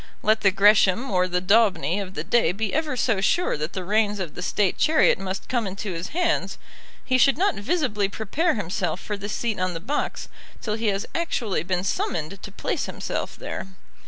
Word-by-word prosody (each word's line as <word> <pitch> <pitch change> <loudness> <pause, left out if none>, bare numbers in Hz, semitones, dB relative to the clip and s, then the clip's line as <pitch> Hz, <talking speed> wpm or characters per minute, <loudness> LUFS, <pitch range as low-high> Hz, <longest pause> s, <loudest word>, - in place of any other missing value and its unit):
Let 215 +1 +3
the 195 - +5
Gresham 200 +3 +4
or 180 -1 +2
the 180 0 -1
Daubeny 200 -2 +3
of 190 -1 -6
the 150 - -3
day 200 -1 +3
be 210 +1 -2
ever 305 -4 -1
so 225 -5 +1
sure 350 - +2
that 155 +2 -4
the 185 - -4
reins 210 +1 +1
of 175 -5 -4
the - - -7
State 190 +1 0
chariot 310 -8 +4
must 190 0 -5
come 240 -4 0
into 195 0 -4
his 165 +2 -4
hands, 355 +2 0 0.5
he 255 0 +2
should 275 +2 +5
not 395 +3 +2
visibly 210 - 0
prepare 280 - 0
himself 180 -3 -2
for 210 - -4
the 200 0 -6
seat 225 -1 -2
on 185 -1 -1
the - - -3
box 275 - -3 0.3
till 215 - -3
he 220 +1 -2
has 200 +1 0
actually 245 - -1
been 180 +1 -1
summoned 185 0 -2
to 200 - -8
place - - -2
himself - - -4
there. - - -5
205 Hz, 200 wpm, -24 LUFS, 185-230 Hz, 0.5 s, the